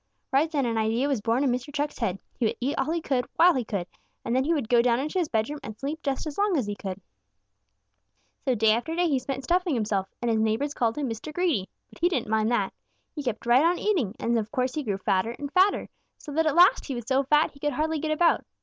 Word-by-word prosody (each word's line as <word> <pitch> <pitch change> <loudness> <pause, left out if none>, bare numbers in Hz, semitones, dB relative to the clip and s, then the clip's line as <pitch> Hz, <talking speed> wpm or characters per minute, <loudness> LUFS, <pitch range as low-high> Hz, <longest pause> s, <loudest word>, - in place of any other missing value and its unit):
Right 280 +4 +3
then 285 -5 0
an 230 -2 0
idea 225 +5 +1
was 270 -7 0
born 230 +5 +1
in 270 - +2
Mr. 250 +3 -3
Chuck's 290 0 -3
head. 185 0 -1 0.2
He 240 - +1
would - - -2
eat 265 +4 -1
all - - -1
he 335 +1 -1
could 255 -5 -1
while 355 +1 +6
he 255 - -1
could, 200 -5 -3 0.4
and 235 - 0
then 260 - +3
he 325 - +1
would 290 -9 0
go 240 -1 +5
down 240 0 +2
into 305 +7 -1
his 335 -4 -1
bedroom 230 +7 -1
and 215 0 -8
sleep 290 +6 -4
just 275 +1 -2
as 310 +2 -5
long 405 -4 +2
as 255 - 0
he 205 - -3
could! 190 -1 -6 1.4
"So 260 -2 +1
day 220 0 +4
after 240 +9 -1
day 350 0 +2
he 280 -5 +1
spent 265 +1 -5
stuffing 350 +1 +1
himself, 205 -4 -1
and 240 -1 0
his 220 - +1
neighbors 220 +7 0
called 230 -2 0
him 290 -2 -1
Mr. 225 +6 -5
Greedy. 305 - 0 0.2
But - - -16
he 345 +1 +3
didn't 255 -11 -2
mind 220 0 +2
that. 205 -5 0 0.4
He 300 - -5
kept 245 -5 -4
right 245 +4 +5
on 345 +2 +3
eating, 320 - 0
and 235 0 +1
of 215 0 -5
course 255 -2 -1
he 305 - -2
grew 205 -8 -2
fatter 195 +4 0
and 285 0 -6
fatter, 380 +2 +3 0.3
so 295 - -10
that 320 +2 +1
at 305 - +1
last 360 +7 +6
he 270 - -3
was 240 -2 -5
so 265 0 +3
fat 300 +3 +3
he 280 - -18
could 295 0 -1
hardly 310 +3 -1
get 315 - -3
about. 330 +2 +3
265 Hz, 265 wpm, -26 LUFS, 225-310 Hz, 1.4 s, while